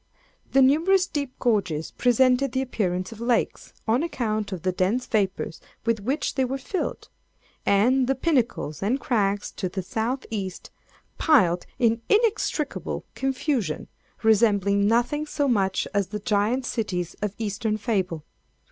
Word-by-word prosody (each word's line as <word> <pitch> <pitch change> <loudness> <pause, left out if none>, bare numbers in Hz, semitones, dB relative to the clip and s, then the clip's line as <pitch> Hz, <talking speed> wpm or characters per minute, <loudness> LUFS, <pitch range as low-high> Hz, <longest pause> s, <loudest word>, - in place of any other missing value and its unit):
The 270 0 +6
numerous 340 +8 +4
deep 285 -7 -4
gorges 185 -10 0
presented 250 +1 +3
the 260 - +1
appearance 185 -7 -2
of 225 0 -10
lakes, 235 -1 0 0.2
on 230 +5 +3
account 215 -10 -2
of 185 -4 -5
the 185 - +1
dense 195 +8 0
vapors 195 -6 -1 0.2
with 230 -1 +1
which 265 +9 -1
they 265 - +1
were 260 +2 -1
filled, 345 +8 -4 0.6
and 245 +6 +4
the 270 - +2
pinnacles 250 - 0
and 230 +8 +1
crags 205 -6 0
to 185 - -3
the 190 +1 -4
South 230 +7 -2
East, 190 -4 -5 0.5
piled 185 - +3
in 230 -1 +2
inextricable 420 - 0
confusion, 265 - -1 0.3
resembling 200 -2 +3
nothing 245 +7 +1
so 290 -1 0
much 195 -6 +1
as 200 -2 +1
the 210 +2 -5
giant 215 +4 +1
cities 180 -9 -2
of 205 -1 -2
eastern 215 0 -1
fable. 190 -7 -1
225 Hz, 140 wpm, -25 LUFS, 200-265 Hz, 0.6 s, The